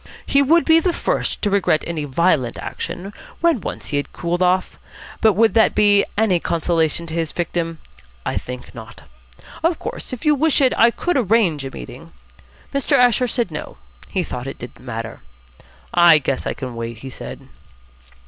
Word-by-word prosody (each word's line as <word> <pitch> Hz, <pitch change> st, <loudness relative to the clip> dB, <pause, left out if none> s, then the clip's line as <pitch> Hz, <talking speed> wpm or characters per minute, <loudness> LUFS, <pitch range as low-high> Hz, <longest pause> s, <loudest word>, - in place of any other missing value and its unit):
He 280 Hz, -, +3 dB
would 325 Hz, +5 st, +4 dB
be 325 Hz, 0 st, +6 dB
the 350 Hz, +1 st, 0 dB
first -, -, -2 dB
to 205 Hz, -, +1 dB
regret 190 Hz, -6 st, +2 dB
any 160 Hz, -3 st, -3 dB
violent 145 Hz, -4 st, +1 dB
action, 195 Hz, +3 st, -6 dB, 0.3 s
when 335 Hz, -, +2 dB
once -, -, -5 dB
he 145 Hz, -, 0 dB
had 145 Hz, -1 st, -3 dB
cooled 175 Hz, +1 st, -2 dB
off, 185 Hz, +1 st, +1 dB, 0.4 s
but 220 Hz, -2 st, +5 dB
would 225 Hz, +3 st, +3 dB
that 225 Hz, -1 st, +4 dB
be 205 Hz, -1 st, +4 dB
any 205 Hz, -5 st, +3 dB
consolation 165 Hz, 0 st, 0 dB
to 160 Hz, -, -7 dB
his 165 Hz, -2 st, -2 dB
victim? 170 Hz, -1 st, -2 dB, 0.5 s
I -, -, -1 dB
think 125 Hz, 0 st, -6 dB
not. 110 Hz, -8 st, -11 dB, 0.6 s
Of 330 Hz, +1 st, +1 dB
course, -, -, -6 dB
if 255 Hz, +2 st, -7 dB
you 300 Hz, -, +5 dB
wish 305 Hz, +2 st, +2 dB
it, 265 Hz, -2 st, +4 dB
I 230 Hz, -, +6 dB
could 350 Hz, +7 st, -1 dB
arrange 205 Hz, -, +2 dB
a -, -, -4 dB
meeting -, -, -10 dB, 0.3 s
" -, -, -28 dB
Mr. 280 Hz, 0 st, +2 dB
Asher 250 Hz, 0 st, +4 dB
said 240 Hz, -1 st, -2 dB
no, -, -, -7 dB, 0.3 s
he 185 Hz, -3 st, -1 dB
thought 125 Hz, -5 st, -6 dB
it 135 Hz, -, -6 dB
didn't 120 Hz, -, -10 dB
matter. 115 Hz, -2 st, -6 dB, 0.7 s
"I 175 Hz, -2 st, +7 dB
guess 135 Hz, -2 st, -2 dB
I -, -, -2 dB
can 130 Hz, -3 st, -6 dB
wait," 115 Hz, 0 st, -5 dB
he 130 Hz, +4 st, -9 dB
said. -, -, -9 dB
175 Hz, 185 wpm, -20 LUFS, 145-235 Hz, 0.7 s, I